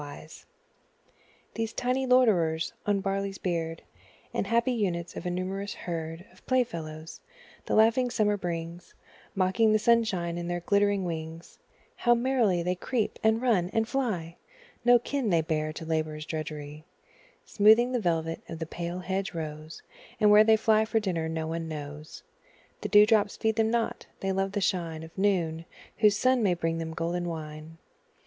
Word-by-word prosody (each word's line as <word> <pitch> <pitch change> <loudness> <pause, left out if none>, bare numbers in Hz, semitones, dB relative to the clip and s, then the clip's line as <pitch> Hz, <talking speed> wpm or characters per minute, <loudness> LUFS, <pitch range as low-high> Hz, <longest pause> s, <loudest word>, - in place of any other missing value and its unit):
Insects 145 +2 -11 1.1
These 225 0 -3
tiny 255 +2 -1
loiterers 180 -11 +3
on 205 - +3
the 195 - -1
barley's 195 0 -2
beard, 165 -2 -3 0.5
And - - -1
happy 235 +3 +2
units 180 -7 -2
of - - -5
a - - 0
numerous 190 +3 -3
herd 165 0 -5
Of - - -22
playfellows, 165 -11 -2 0.5
the - - 0
laughing 230 +3 +4
Summer 215 -4 +1
brings, 170 -2 -6 0.4
Mocking 190 +4 +3
the - - +5
sunshine 210 -7 +1
in 170 - -5
their 175 0 -2
glittering 200 +1 +2
wings, 165 0 -6 0.4
How 240 -1 +4
merrily 235 -8 +1
they 180 +1 0
creep, 220 +5 -2
and 220 +2 +2
run, 195 -8 +2
and 225 0 +1
fly! 210 -11 -2 0.5
No 245 0 +7
kin 245 0 -2
they 170 -3 +3
bear 155 -1 -1
to 160 - -7
labour's 155 -1 -2
drudgery, 155 -1 -6 0.6
Smoothing 220 +4 +5
the 250 - 0
velvet 165 -4 -1
of 165 - -6
the 160 - -4
pale 175 +2 -5
hedge 190 +1 -3
rose; 155 0 -7 0.4
And 210 -1 +5
where 210 +1 +8
they 220 0 +5
fly 220 0 +3
for 225 +1 0
dinner 170 -6 -2
no 160 0 -3
one 165 +1 -4
knows 150 0 -8 0.6
The 210 - -3
dew 205 +1 +7
drops 210 -2 +2
feed 220 -1 0
them 220 -1 +2
not 230 0 -1
they 195 - -1
love 195 +1 -1
the 205 - -1
shine 165 -4 -1
Of 160 - -12
noon, 170 -5 0 0.3
whose 210 -1 +4
sun 255 +1 +3
may 190 -5 +2
bring 165 -1 -2
them 160 0 -5
golden 175 +1 -2
wine. 155 0 -8
185 Hz, 170 wpm, -28 LUFS, 165-220 Hz, 1.1 s, where